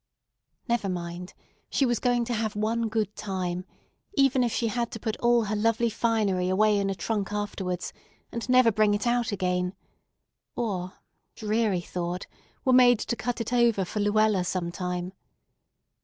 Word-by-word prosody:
Never 235 -5 0
mind, 175 0 -5 0.3
she 275 - +2
was 240 -3 +1
going 245 -1 +1
to 240 - -2
have 220 -2 -1
one 225 +2 0
good 215 -2 -1
time, 185 -3 -3 0.5
even 270 -2 +4
if 240 - 0
she 230 0 0
had 235 +1 -1
to 225 - -5
put 220 -1 -2
all 240 -1 +3
her 215 0 -2
lovely 230 +2 +1
finery 210 -5 +1
away 210 +2 +3
in 195 0 0
a 195 - -1
trunk 205 0 -2
afterwards, 195 -3 -3 0.4
and 235 +1 -5
never 255 -2 +6
bring 210 -1 +3
it 205 - -2
out 240 -1 +1
again, 180 -1 -1 0.8
or—dreary 210 0 -2
thought—were 180 +9 -4
made 245 -1 +7
to 235 - -2
cut 245 0 -3
it 230 +2 -3
over 235 -5 +3
for 210 - -4
Luella 205 -2 +3
sometime. 180 0 -3
215 Hz, 155 wpm, -27 LUFS, 185-235 Hz, 0.8 s, made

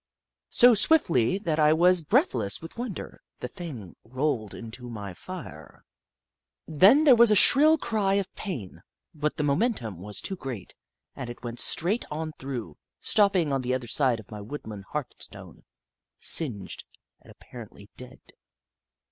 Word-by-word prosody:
So 245 0 +6
swiftly 190 - +3
that 165 -6 -2
I 150 0 +5
was 175 +2 +4
breathless 115 -8 0
with 165 - -11
wonder, 235 -5 -7 0.2
the - - -5
thing 125 - -9
rolled 130 -3 -3
into 120 +2 -9
my 105 -5 -7
fire. 90 - -11 0.8
Then 195 - +5
there 275 -5 +7
was 235 -1 +6
a 210 - +4
shrill 305 +10 +6
cry 205 -8 0
of 200 -2 -2
pain, 130 - -7 0.3
but 150 0 -2
the 150 - -1
momentum 140 - -1
was 105 +1 -3
too 195 - -2
great, 125 - -7 0.4
and 130 -3 -6
it 120 - -10
went 120 0 -5
straight 200 +8 0
on 155 +1 -4
through, 120 - -6 0.2
stopping 195 -8 +2
on 135 - 0
the 130 0 -1
other 130 -2 -5
side 125 -1 +1
of 110 - -14
my 105 -1 -7
woodland 105 -4 -8
hearthstone, 150 -3 -8 0.5
singed, 110 - +1 0.4
and - - -20
apparently 110 -4 -13
dead. 125 0 -11
145 Hz, 150 wpm, -26 LUFS, 115-185 Hz, 0.8 s, there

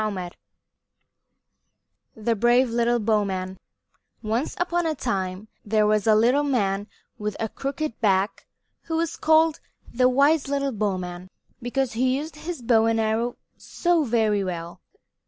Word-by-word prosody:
XIV 190 -5 -3 1.8
THE 225 +1 0
BRAVE 240 +3 +3
LITTLE 235 +1 +2
BOWMAN 195 -4 -1 0.6
Once 225 +6 -1
upon 350 -1 0
a 315 - -1
time 195 -5 -3 0.2
there 215 0 +2
was 210 0 +1
a 215 - +6
little 245 +6 +4
man 205 -8 0 0.3
with 210 -1 -3
a 225 - -1
crooked 275 +2 -4
back 195 -1 +1 0.4
who 325 -1 -2
was 335 0 -1
called 315 0 +3 0.3
the 250 +1 +4
wise 280 +3 +3
little 280 0 -1
bowman 185 -4 -3 0.3
because 245 +1 -1
he 255 +3 +1
used 310 +3 -6
his 320 -4 -6
bow 225 -1 +4
and 225 0 +1
arrow 225 +2 0 0.2
so 345 -2 0
very 220 -5 +1
well. 170 -2 -6
230 Hz, 135 wpm, -24 LUFS, 210-275 Hz, 1.8 s, a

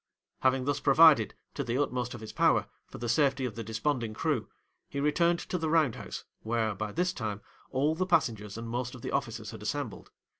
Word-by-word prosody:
'Having 130 0 +2
thus 145 0 0
provided, 155 +2 +6 0.2
to 140 - -2
the 120 0 -1
utmost 125 -4 -1
of 115 - -9
his 110 - -8
power, - - +3 0.2
for - - -10
the 120 - -4
safety 135 +2 +2
of 120 - -3
the 115 - -5
desponding 115 +1 -1
crew, - - -1 0.4
he 140 - -4
returned 170 +4 +3
to 180 - -3
the 160 -1 -1
round 155 -6 +3
house, - - -7 0.2
where, 110 -1 0
by 105 +1 -4
this 180 - 0
time, 105 - -3 0.3
all 140 +4 +1
the 185 +3 -1
passengers 110 - +1
and 115 0 -5
most 125 +2 -3
of 125 - -12
the - - -3
officers - - -2
had - - -9
assembled. - - -4
130 Hz, 210 wpm, -30 LUFS, 115-150 Hz, 0.4 s, provided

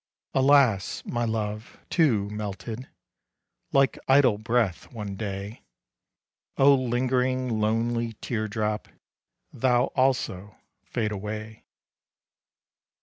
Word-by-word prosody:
Alas! 135 -7 +3
my 120 0 -1
love, 110 0 -3
too, 120 - +3
melted 105 +3 -5 0.8
Like 135 -1 +3
idle 130 -6 +5
breath 115 -5 0
one 105 -5 -6
day; 100 +1 -5 1.0
Oh 140 +1 +7
lingering, 130 -1 0
lonely 115 +2 0
tear 110 0 -3
drop, 105 0 -2 0.7
Thou 125 +1 +2
also 115 -7 0 0.3
fade 110 -3 -2
away! 105 +2 -6
115 Hz, 90 wpm, -26 LUFS, 105-130 Hz, 1.0 s, Oh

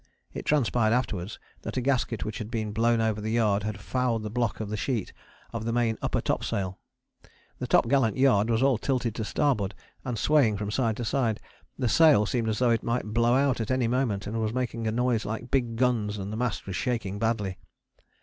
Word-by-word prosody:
It - - -6
transpired 120 -6 +2
afterwards 105 -5 -2 0.2
that - - -5
a - - +3
gasket 125 -4 0
which 110 - -4
had 110 -1 -5
been 110 -3 -2
blown 115 +2 +2
over 110 -1 0
the 110 - -3
yard 110 -3 +2
had 105 -1 -4
fouled 120 0 -1
the 105 - -5
block 120 -2 -1
of 110 -2 -4
the - - -1
sheet 115 -2 -2 0.4
of 115 -1 -3
the 115 - -1
main 115 -1 +1
upper - - 0
topsail. 95 -1 -2 0.8
The - - -3
topgallant 120 -2 +3
yard 120 -5 +4
was 115 +2 +2
all 135 -5 +3
tilted 125 -4 -1
to 110 - -3
starboard 110 -4 0 0.3
and 125 -3 -3
swaying 125 -5 +3
from 105 0 -3
side 115 -2 0
to 120 - -3
side, 115 -3 0 0.4
the 125 - 0
sail 145 -4 +5
seemed 115 +1 -1
as 110 - -1
though 125 0 +3
it 115 - +2
might 115 -2 -2
blow 120 +2 +3
out 135 -3 +2
at 110 - -4
any 130 -2 +1
moment, 115 -5 0
and 110 +2 -3
was 110 +1 -1
making 115 -3 -2
a - - +1
noise 120 -1 +1
like 115 +3 -5
big 120 -4 +1
guns, 115 -4 +1
and 100 +1 -5
the - - -3
mast 120 -2 -2
was 95 - -5
shaking 110 -5 -2
badly. 105 -4 -1
115 Hz, 215 wpm, -27 LUFS, 105-125 Hz, 0.8 s, sail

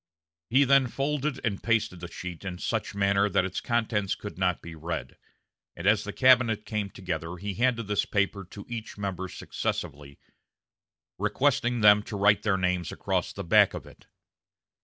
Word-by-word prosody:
He 130 +5 +5
then 135 -1 +4
folded 145 +2 -2
and 100 -4 -1
pasted 110 -5 0
the 90 - -6
sheet 90 0 -8
in 95 -2 -5
such 110 +2 -3
manner 100 0 +2
that 95 - +2
its 95 - -4
contents 110 -5 0
could 105 - -8
not 90 -1 0
be 85 - -10
read, 80 +1 -5 0.6
and 85 - -7
as 105 +1 +4
the 105 - -4
cabinet 120 -3 +4
came 105 -2 -2
together 90 -3 -5
he 100 +2 -4
handed 120 0 +1
this 105 0 +1
paper 100 0 0
to 100 +3 -11
each 115 -3 -7
member 95 -2 -3
successively, 70 -4 -5 1.0
requesting 120 +3 +1
them 105 0 +7
to 105 0 -6
write 100 +1 +4
their 105 -3 +1
names 90 -2 -1
across - - -2
the - - -6
back - - +4
of - - -7
it. - - -17
100 Hz, 170 wpm, -27 LUFS, 90-115 Hz, 1.0 s, them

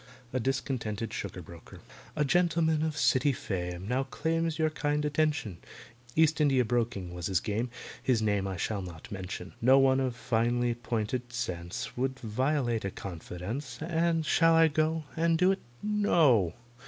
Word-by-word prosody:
A 130 - +1
DISCONTENTED 120 -4 -2
SUGAR - - -5
BROKER - - -12 0.4
A 150 - +1
GENTLEMAN 165 -1 +2
of 155 -1 -1
City 140 -2 +3
fame 90 -6 -4
Now 125 +3 +1
claims 165 +3 -1
your 155 -1 +1
kind 150 -1 -1
attention; 145 - 0 0.6
East 160 0 +4
India 135 -4 +4
broking 115 -6 -1
was 90 -1 -4
his 95 -3 +2
game, 110 +4 -2 0.3
His 125 -4 +2
name 105 -3 +1
I 95 -1 -4
shall 100 +3 -2
not 85 -3 -9
mention: 95 -1 -6
No 130 +3 +6
one 135 -1 +4
of 130 -2 -1
finely 120 0 +1
pointed 120 +1 -3
sense 90 -7 -4
Would 130 +1 -1
violate 125 0 0
a 100 - -1
confidence, 95 - -6
And 165 0 0
shall 165 0 +4
I 165 0 +6
go 155 +1 0
And 165 0 +2
do 180 +3 +4
it? 195 - -1 0.2
No! 160 - +3
130 Hz, 155 wpm, -30 LUFS, 105-155 Hz, 0.6 s, No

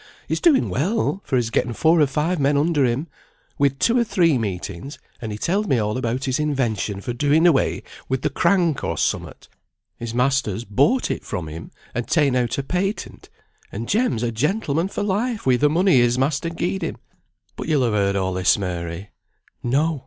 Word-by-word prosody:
He's - - -2
doing 315 -7 +4
well, 195 - 0
for 135 - -2
he's 120 -2 0
getten 120 - 0
four 160 +6 +3
or 145 - +5
five 150 +5 -1
men 140 +1 +2
under 150 -2 +2
him; 125 +5 0 0.5
we'd 140 -1 +2
two 240 +1 +3
or - - +4
three 180 -8 +2
meetings, 100 - -4 0.2
and 110 -2 -4
he 105 - -4
telled 200 - 0
me 135 - +2
all 105 -1 -1
about 125 +1 -2
his 130 +1 0
invention 120 -9 -1
for 120 - -4
doing 145 +6 +2
away 160 -6 +2 0.3
wi' 130 - +1
the 130 - -2
crank, 175 -7 +2
or - - -2
somewhat. - - -2 0.5
His 115 -1 -6
master's 125 -4 +1
bought 140 - +2
it - - -4
from 85 -3 -4
him, 80 +2 -8 0.2
and 120 0 -3
ta'en 150 -5 +2
out 120 -2 0
a 140 - -1
patent, 190 +8 -3 0.4
and 115 +3 -5
Jem's 210 - +1
a 120 - 0
gentleman 155 - 0
for 205 - -4
life 210 +3 -1
wi' 130 -1 +4
the 150 +3 +3
money 175 0 +3
his 120 0 +3
master 145 +5 0
gied 175 +3 -2
him. - - -3 0.6
But - - -6
you'll 145 -6 +2
ha' 115 - -1
heard 100 -1 +1
all 95 -1 0
this, 90 0 +3
Mary?" 90 0 -5 0.5
No! 145 +5 +1
135 Hz, 195 wpm, -22 LUFS, 115-165 Hz, 0.6 s, or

